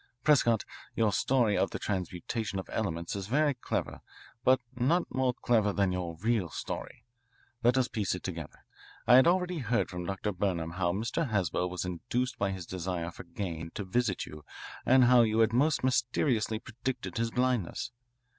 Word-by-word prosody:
Prescott, 120 -7 +4 0.3
your 110 -3 +2
story 120 -2 +2
of 95 - +2
the - - -4
transmutation 95 +3 -3
of 95 - -4
elements 85 -6 -2
is 100 -1 -4
very 145 +5 +2
clever, 125 - -3 0.4
but 130 +1 +5 0.2
not 150 +9 +2
more 130 -1 +2
clever 110 -4 +2
than 100 -1 +1
your 90 -3 -3
real 110 -5 +1
story. 70 - -6 0.6
Let 120 +2 +4
us 130 -1 +3
piece 105 -8 -1
it 90 - -8
together. 85 -4 -7 0.4
I 125 - +8
had 130 - +6
already 180 -1 +2
heard 120 -4 0
from 90 -1 -5
Dr. 100 +2 -2
Burnham 90 -4 -1
how 90 0 0
Mr. 115 - -1
Haswell 90 -3 0
was 90 0 -3
induced 120 +9 -2
by 100 - +1
his 95 -2 -5
desire 90 -1 -3
for - - -11
gain 85 -3 -5
to 105 - -3
visit 100 0 0
you 75 -1 -11 0.4
and 130 0 +6
how 125 0 +7
you 110 -1 +2
had 115 0 +4
most 135 +2 +2
mysteriously 120 -2 +1
predicted 120 +3 -5
his 115 0 +1
blindness. 125 -5 -1
110 Hz, 175 wpm, -30 LUFS, 90-125 Hz, 0.6 s, I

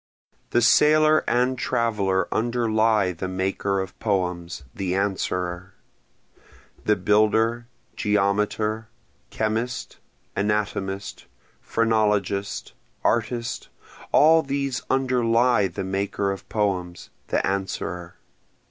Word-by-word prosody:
The 120 - +2
sailor 155 +4 +5
and 125 +1 +1
traveler 105 -8 0
underlie 110 -4 +2
the 90 +2 -5
maker 95 +1 -1
of 95 -1 -6
poems, 90 -6 -2
the 95 -1 -2
Answerer, 95 -2 -2 1.1
The 105 - +4
builder, 110 +4 +2 0.3
geometer, 105 +1 0 0.4
chemist, 110 +3 -3 0.4
anatomist, 100 -1 -2 0.3
phrenologist, 105 -3 0 0.3
artist, 120 +1 -1 0.4
all 160 +2 +6
these 140 -3 -2
underlie 125 -4 +2
the 90 - -5
maker 100 +1 -1
of 95 - -7
poems, 90 -5 -2 0.2
the - - 0
Answerer. 90 -3 -3
105 Hz, 85 wpm, -24 LUFS, 95-115 Hz, 1.1 s, all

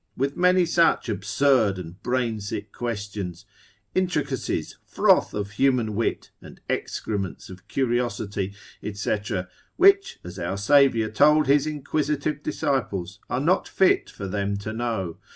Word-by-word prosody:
with 140 +2 -1
many 180 0 +4
such 170 -4 +3
absurd 110 +1 +2
and 90 +1 -9
brain 120 -3 -1
sick 100 0 -5
questions, 100 -6 -5 0.5
intricacies, 185 -1 -1
froth - - +3
of 105 0 -3
human 120 -1 +1
wit, 115 +3 -2
and - - -13
excrements 100 -4 -3
of 90 -1 -13
curiosity, 115 -6 -1 0.4
&c., 100 +1 -1 0.6
which, 395 +2 +4
as 90 - -8
our 90 +3 -2
Saviour 115 0 +4
told 150 +6 +4
his 140 +2 +3
inquisitive 150 0 -2
disciples, 100 -11 -2
are 125 - 0
not 170 +7 +2
fit 190 - +2
for 100 - -7
them 100 +1 -1
to 110 +2 -5
know. 110 -8 -3
115 Hz, 130 wpm, -25 LUFS, 100-145 Hz, 0.6 s, many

